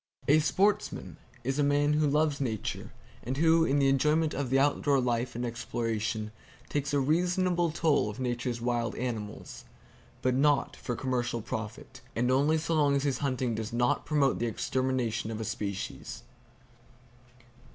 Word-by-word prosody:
A 150 +2 +6
Sportsman 195 +6 0 0.3
is 135 +3 -1
a - - +4
man 145 +1 +3
who 150 0 +2
loves 150 -1 +1
Nature, 110 -6 -3 0.3
and 130 +3 -4
who 165 +1 +4
in 140 -2 +2
the 140 -1 +3
enjoyment 150 +4 +2
of 135 -2 -2
the 135 - +3
outdoor 140 0 +3
life 120 -1 -1
and 120 +1 -2
exploration 110 -2 -2 0.4
takes 145 -1 -1
a 145 - +2
reasonable 175 +4 +1
toll 155 -7 +2
of 105 - -8
Nature's 120 -1 -2
wild 120 -1 -1
animals, 110 -4 -5 0.6
but 130 - +2
not 145 +2 +2
for 120 - -4
commercial 120 -2 -1
profit, 110 +3 -6
and 125 +2 +1
only 145 +5 +3
so 160 +1 -2
long 145 -3 +3
as 140 - 0
his 140 -3 0
hunting 130 -4 -1
does 110 +1 -4
not 120 +1 +1
promote 145 -3 +2
the 120 - 0
extermination 120 -1 -1
of 110 0 -4
species. 100 -2 -5
130 Hz, 155 wpm, -29 LUFS, 120-145 Hz, 0.6 s, A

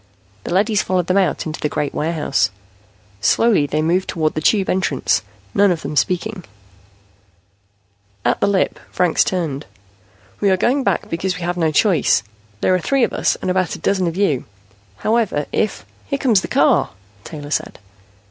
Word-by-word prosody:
The - - -4
leadys 210 +2 +2
followed 185 -2 0
them 185 +3 +2
out 185 -6 0
into 155 -1 -5
the 150 - -1
great 150 -1 -2
warehouse. 155 - 0 0.7
Slowly 190 - +3
they 155 +2 -1
moved 180 +4 +1
toward 155 -3 0
the 155 - -3
Tube 195 +4 +2
entrance, 185 -7 +1 0.3
none 200 0 +4
of 165 -3 -2
them 150 +2 -4
speaking. 185 +5 -1 1.8
At - - +2
the - - +3
lip, 200 -2 +1
Franks 180 -2 +2
turned. 155 -6 -3 0.7
"We 200 - +2
are 190 - +3
going 260 +8 +1
back 200 -6 0
because 180 +2 -1
we 180 - -6
have 175 +1 -1
no 165 -3 +1
choice. 155 - +3 0.4
There - - +3
are 185 - +2
three 270 +7 +1
of - - +1
us - - +1
and 185 - 0
about 185 -1 0
a - - -8
dozen 190 -3 0
of 170 +1 -3
you. 175 -11 +1 0.5
However, 215 -10 0
if 215 - -1
" - - -31
"Here 280 - -1
comes 235 -8 +3
the - - -5
car," - - +3 0.3
Taylor 145 -2 -8
said. - - -2
180 Hz, 175 wpm, -19 LUFS, 155-200 Hz, 1.8 s, none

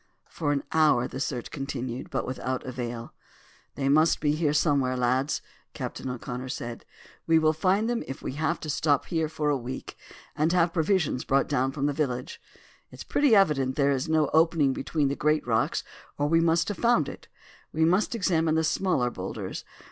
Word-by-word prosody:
For 145 -3 -2
an 140 -1 0
hour 150 -6 +3
the 130 - -7
search 125 -3 -3
continued, 130 -3 -5
but - - -2
without 130 0 -3
avail. 120 -2 -5 0.6
"They 135 - -1
must 155 +4 +4
be 150 - +1
here 155 -1 +1
somewhere, 140 -4 +2
lads," 130 +4 0 0.3
Captain 130 - -5
O'Connor 125 +1 -5
said. 120 -3 -6 0.4
"We 165 0 +5
will 155 0 +3
find 190 +7 +1
them 240 0 -1
if 135 - -7
we - - -3
have 155 +4 -1
to 155 - -6
stop 145 -1 +1
here 160 -2 -1
a 150 -1 +2
week, 130 0 -6 0.4
and 155 +2 +1
have 170 -1 +3
provisions 165 -6 +1
brought 135 0 +2
down 135 -2 0
from 140 0 -2
the 145 - +1
village. 125 -4 -3 0.5
It's - - -10
pretty 285 -6 +3
evident 135 -9 +3
there 140 -1 +3
is 135 +3 -1
no 155 -2 +2
opening 160 -4 +3
between 145 +2 -1
the 140 - -1
great 150 +1 +1
rocks 115 -2 0 0.3
or 145 - 0
we 165 +2 +3
must 165 +2 +2
have 205 - -4
found 235 0 +3
it. - - -9 0.4
We 160 +1 +2
must 185 +7 +2
examine 165 -6 +1
the 160 - +2
smaller 160 -7 +1
boulders. - - -6
145 Hz, 185 wpm, -27 LUFS, 130-160 Hz, 0.6 s, We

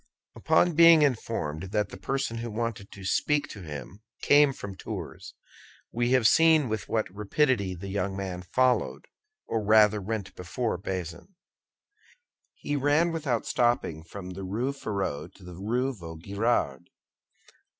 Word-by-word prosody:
Upon 175 - +3
being 165 -1 +7
informed 95 - -2
that 105 -2 +1
the - - -9
person 135 -4 -2
who 115 +1 -4
wanted 110 -2 -4
to 100 -1 -10
speak 145 +5 +1
to 100 - -9
him 75 - -8 0.2
came 145 -1 +6
from 100 -7 -8
Tours, - - -7 0.6
we 120 +1 0
have 125 -4 +5
seen 160 -2 +5
with 110 -3 -4
what 110 -1 0
rapidity 105 -2 0
the 95 +3 -8
young 95 0 -2
man 95 -2 -4
followed, 125 +7 +1 0.4
or 110 -1 -2
rather 105 0 +5
went 100 -1 -4
before, 95 +3 -3
Bazin; 90 - -6 1.2
he 145 - -3
ran 145 +5 +2
without 145 -8 -1
stopping 120 -10 0
from 90 +2 -9
the 95 +1 -7
Rue 110 +8 -2
Férou 95 - -4
to 95 - -17
the 90 0 -10
Rue 120 +9 -1
de 110 - -16
Vaugirard. 85 - -2
110 Hz, 145 wpm, -27 LUFS, 95-130 Hz, 1.2 s, being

